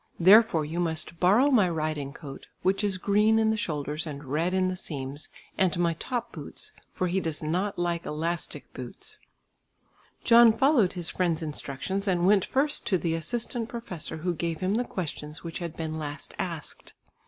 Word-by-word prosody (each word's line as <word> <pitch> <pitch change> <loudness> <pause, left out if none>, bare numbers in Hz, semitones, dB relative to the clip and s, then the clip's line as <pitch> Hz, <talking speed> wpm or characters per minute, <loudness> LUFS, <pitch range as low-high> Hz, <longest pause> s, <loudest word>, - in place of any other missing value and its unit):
Therefore 185 -3 +6
you 165 +4 -4
must 165 -1 -1
borrow 220 +11 +5
my 210 -8 +4
riding 155 -4 -2
coat, 140 -2 -10 0.2
which 195 +3 +2
is 200 -2 0
green 210 +3 +3
in 220 0 +3
the - - +1
shoulders 150 -5 -3
and 145 -1 -7
red 155 +7 0
in 185 0 +2
the 185 - -2
seams, 145 -3 -5 0.3
and 190 -2 +2
my 170 -1 +2
top 240 +7 -4
boots, 150 -4 -9 0.2
for 185 - -2
he 180 +2 +1
does 160 -4 -3
not 180 +6 -1
like 175 -1 -1
elastic 165 +3 -4
boots." - - -8 1.0
John 230 -1 +7
followed 240 - +3
his 175 -2 -2
friend's 170 -3 0
instructions 155 +6 -3
and 175 -2 +2
went 195 -1 +4
first 290 +2 +1
to 185 - +3
the 165 -1 -1
assistant 230 +7 -2
professor 180 -9 -5
who 180 - +1
gave 165 -1 -3
him 185 +2 0
the 245 +3 +1
questions 150 -5 -5
which 165 -1 -5
had 170 -2 -6
been 160 -1 -3
last 145 -1 -6
asked. 165 -5 -5
175 Hz, 175 wpm, -27 LUFS, 155-200 Hz, 1.0 s, John